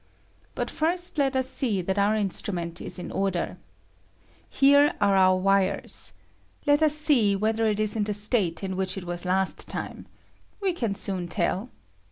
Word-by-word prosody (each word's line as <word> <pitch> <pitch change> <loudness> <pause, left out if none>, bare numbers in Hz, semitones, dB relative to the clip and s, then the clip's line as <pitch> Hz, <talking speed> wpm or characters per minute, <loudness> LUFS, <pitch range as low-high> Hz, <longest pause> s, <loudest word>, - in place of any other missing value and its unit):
But - - -2
first 340 +1 +1
let 270 -1 +1
ua 260 - +2
see 250 -5 -1
that 190 +3 -1
our 205 +2 +3
instrument 180 -4 -2
is - - -3
in 180 - -6
order. 195 -3 -2 0.9
Here 285 +1 +4
are 200 -1 +3
our 185 -1 +5
wires. 195 0 0 0.5
Let 290 0 +4
us 305 -1 +3
see 270 -10 +3
whether 220 +2 +1
it 210 -1 0
ia 215 - +2
in 210 -2 0
the 210 - -1
state 205 -5 0
in 190 -1 -3
which 190 0 -2
it 190 - -5
was 175 +1 -4
last 190 +1 -1
time. - - -6 0.5
We 390 -3 0
can 230 -11 -2
soon 185 -3 -2
tell. 185 +6 -1
205 Hz, 170 wpm, -26 LUFS, 190-260 Hz, 0.9 s, our